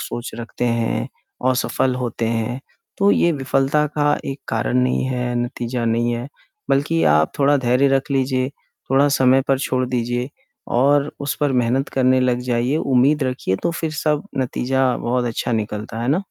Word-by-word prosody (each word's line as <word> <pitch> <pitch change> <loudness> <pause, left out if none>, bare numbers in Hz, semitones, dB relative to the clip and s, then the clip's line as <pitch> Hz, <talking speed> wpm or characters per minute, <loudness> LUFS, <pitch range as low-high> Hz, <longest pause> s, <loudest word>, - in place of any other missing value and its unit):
सोच 120 +1 -5
रखते 120 +1 -4
हैं, 115 -1 0 0.4
असफल 130 0 0
होते 120 -2 -2
हैं, 115 +3 -2 0.4
तो 200 0 +4
ये 170 - +3
विफलता 135 +2 +1
का 145 0 +3
एक 135 +1 -5
कारण 115 +2 0
नहीं 125 +1 +1
है, 125 -1 -2
नतीजा 120 0 -3
नहीं 120 +1 +1
है 120 +3 -4 0.4
बल्कि 155 +4 +2
आप 75 +1 +3
थोड़ा 145 +1 +4
धैर्य 130 +2 +2
रख 135 +1 0
लीजिए, 130 -1 +1 0.4
थोड़ा 140 +2 +4
समय 135 -1 +4
पर 135 -1 +3
छोड़ 130 -2 -1
दीजिए 120 +1 -1 0.5
और 140 +2 +3
उस 140 0 -2
पर 145 -2 +2
मेहनत 125 +2 +1
करने 130 0 +3
लग 125 -1 +1
जाइए, 125 +3 0
उम्मीद 140 +1 +2
रखिए 125 -7 -1
तो - - +2
फिर 160 -1 -3
सब 150 -1 0 0.2
नतीजा 130 0 0
बहुत 125 +1 -1
अच्छा 120 +1 -2
निकलता 110 0 -3
है, - - -3
है - - -2
ना? 175 +7 +1
130 Hz, 175 wpm, -20 LUFS, 120-140 Hz, 0.5 s, तो